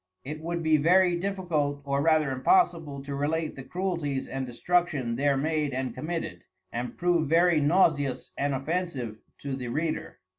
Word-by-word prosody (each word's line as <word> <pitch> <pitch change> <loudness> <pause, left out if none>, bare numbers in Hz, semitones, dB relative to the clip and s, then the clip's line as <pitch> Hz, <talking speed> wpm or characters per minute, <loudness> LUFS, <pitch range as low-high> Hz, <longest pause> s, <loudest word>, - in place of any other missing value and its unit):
It 155 +3 -6
would 170 +1 -3
be 160 -1 +4
very 175 +4 +4
difficult 170 -6 -1
or 140 0 0
rather 155 -2 +3
impossible 150 - +2
to 140 0 -5
relate 155 +3 -1
the 135 - -7
Cruelties 165 -3 -2
and 135 -1 -4
Destruction 145 -2 0
there 140 +2 +2
made 150 -1 0
and 130 -2 -2
committed, 155 - -4 0.3
and 120 +1 -4
prove 175 -4 +1
very 170 -1 +4
nauseous 145 -4 +2
and 140 0 0
offensive 135 -6 -3 0.2
to 140 -2 -3
the 125 -2 -5
Reader. 155 +6 -2
150 Hz, 155 wpm, -27 LUFS, 135-170 Hz, 0.3 s, be